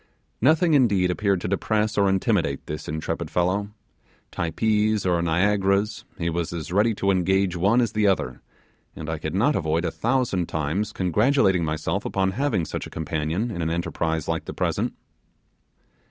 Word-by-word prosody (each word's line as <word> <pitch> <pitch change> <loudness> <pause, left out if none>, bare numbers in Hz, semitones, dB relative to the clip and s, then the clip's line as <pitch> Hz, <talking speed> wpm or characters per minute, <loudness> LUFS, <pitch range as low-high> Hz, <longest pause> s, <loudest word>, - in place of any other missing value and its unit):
Nothing 160 +6 +4
indeed 100 -10 +3
appeared 100 -1 0
to - - -3
depress 105 +3 0
or 100 -1 +3
intimidate 95 -7 0
this 75 0 -6
intrepid 80 +1 -3
fellow. 95 +3 0 0.6
Typees 105 +4 0
or 90 -2 +2
Niagaras, 100 +4 +1
he 85 - -2
was 85 0 -2
as 85 -2 -5
ready 105 +4 +2
to 100 0 +1
engage 95 0 +1
one 100 +8 +3
as 115 -4 0
the 110 -1 +2
other, 65 -10 0 0.5
and 80 0 -5
I 80 - -3
could 80 +3 -4
not 125 +9 +2
avoid 80 -1 0
a - - -1
thousand 120 -8 0
times 80 +8 -1
congratulating 95 - +2
myself 80 0 -2
upon 95 -1 0
having 110 - 0
such - - -5
a - - -11
companion 80 +8 -2
in 85 - -4
an 80 - -1
enterprise 80 -2 -2
like - - -2
the - - -7
present. - - -1
95 Hz, 165 wpm, -24 LUFS, 85-105 Hz, 0.6 s, Nothing